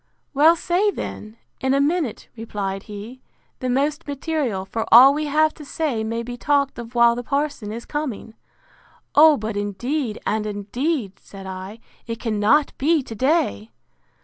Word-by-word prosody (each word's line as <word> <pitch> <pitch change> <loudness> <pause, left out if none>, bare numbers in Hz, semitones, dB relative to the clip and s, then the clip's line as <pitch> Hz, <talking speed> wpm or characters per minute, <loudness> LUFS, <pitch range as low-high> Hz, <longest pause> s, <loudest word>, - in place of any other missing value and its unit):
—Well, 310 +4 +6
say 355 +5 +1
then, 215 - -6 0.2
in 265 0 +1
a - - +2
minute, 290 -4 -1
replied 200 -4 -4
he, 215 +5 -9 0.4
the 255 - -2
most 285 +5 0
material: 280 - -2
for 225 +3 -3
all 260 +4 +9
we 300 +1 -2
have 310 +2 +2
to 300 - -12
say 280 -6 -2
may 230 +1 -3
be 245 +1 -7
talked 280 0 +1
of 235 +1 -9
while 235 0 +6
the 240 - -4
parson 280 -6 -2
is 230 +2 -7
coming.—O, 295 +3 0
but 215 0 -4
indeed, 220 +5 -2
and 215 0 -1
indeed, 210 - -3
said 195 -1 -12
I, 190 +4 -8 0.3
it 230 -1 -4
cannot 225 +6 +2
be 305 +1 +2
to 230 - -8
day! 215 - 0
245 Hz, 155 wpm, -22 LUFS, 215-295 Hz, 0.4 s, all